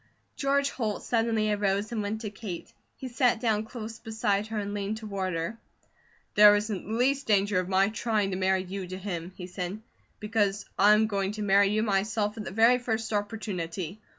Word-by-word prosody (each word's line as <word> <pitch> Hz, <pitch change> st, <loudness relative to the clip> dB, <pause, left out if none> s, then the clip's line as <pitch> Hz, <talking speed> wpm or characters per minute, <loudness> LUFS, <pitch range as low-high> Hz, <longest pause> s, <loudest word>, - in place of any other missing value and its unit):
George 280 Hz, 0 st, +1 dB
Holt 215 Hz, -5 st, -3 dB
suddenly 225 Hz, -2 st, +1 dB
arose 205 Hz, +1 st, 0 dB
and 225 Hz, -2 st, -1 dB
went 210 Hz, +2 st, -3 dB
to 210 Hz, -3 st, -5 dB
Kate. 195 Hz, -4 st, -7 dB, 0.2 s
He 260 Hz, -, -7 dB
sat 245 Hz, -2 st, +2 dB
down 220 Hz, -2 st, +1 dB
close 225 Hz, 0 st, -7 dB
beside 215 Hz, -2 st, -1 dB
her 220 Hz, 0 st, -4 dB
and 205 Hz, -1 st, -3 dB
leaned 205 Hz, +1 st, -2 dB
toward 200 Hz, -4 st, -3 dB
her. 165 Hz, +8 st, -3 dB, 0.7 s
"There 210 Hz, 0 st, +8 dB
isn't 205 Hz, -2 st, -2 dB
the 215 Hz, -, -3 dB
least 270 Hz, +4 st, +1 dB
danger 205 Hz, -2 st, +3 dB
of 185 Hz, 0 st, -3 dB
my 195 Hz, +1 st, +3 dB
trying 215 Hz, -2 st, 0 dB
to -, -, -1 dB
marry 190 Hz, 0 st, +1 dB
you 190 Hz, 0 st, -6 dB
to 185 Hz, +1 st, -6 dB
him," 180 Hz, -3 st, -5 dB
he 180 Hz, -, -7 dB
said, 180 Hz, +2 st, -5 dB, 0.4 s
"because 210 Hz, -2 st, 0 dB
I 205 Hz, +2 st, +7 dB
am 220 Hz, +1 st, +3 dB
going 200 Hz, -2 st, -1 dB
to 215 Hz, 0 st, -4 dB
marry 200 Hz, 0 st, +5 dB
you 215 Hz, +1 st, +1 dB
myself 210 Hz, 0 st, 0 dB
at 215 Hz, -2 st, -6 dB
the -, -, -4 dB
very 225 Hz, +5 st, +4 dB
first 225 Hz, -2 st, -2 dB
opportunity. 200 Hz, -3 st, -3 dB
210 Hz, 195 wpm, -28 LUFS, 195-220 Hz, 0.7 s, There